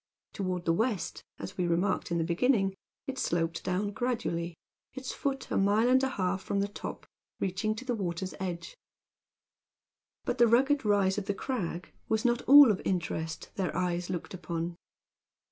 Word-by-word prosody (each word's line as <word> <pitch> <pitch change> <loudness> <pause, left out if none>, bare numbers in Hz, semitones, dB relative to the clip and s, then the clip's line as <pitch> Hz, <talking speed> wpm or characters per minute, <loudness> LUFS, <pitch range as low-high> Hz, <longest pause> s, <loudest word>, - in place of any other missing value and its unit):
Toward 185 -3 -2
the 165 - +3
west, 220 +1 -1
as - - -8
we 175 - +2
remarked 175 +3 +1
in 170 - 0
the 165 - +1
beginning, 195 +3 +2 0.3
it 265 -2 -4
sloped 165 -4 0
down 190 +3 -1
gradually, 175 -8 -2 0.4
its 265 -1 -5
foot 275 -1 -3
a - - +1
mile 205 +4 +3
and 260 +1 +5
a 265 - +1
half 190 -5 -1
from 200 - -1
the 200 - +1
top, 205 - -7 0.3
reaching 195 +3 -1
to 255 - -8
the 250 - 0
water's 185 -3 -3
edge. 185 - -4 1.5
But 250 -1 -1
the 240 - +7
rugged 270 +5 +4
rise 205 -2 +3
of 200 - -7
the 200 - 0
crag 190 -8 -4 0.2
was 220 +2 +1
not 240 0 +3
all 285 -3 +10
of 200 - -2
interest 160 -3 -2
their 190 -3 -1
eyes 175 -1 -1
looked 180 0 -4
upon. 170 -1 -4
195 Hz, 170 wpm, -30 LUFS, 175-240 Hz, 1.5 s, all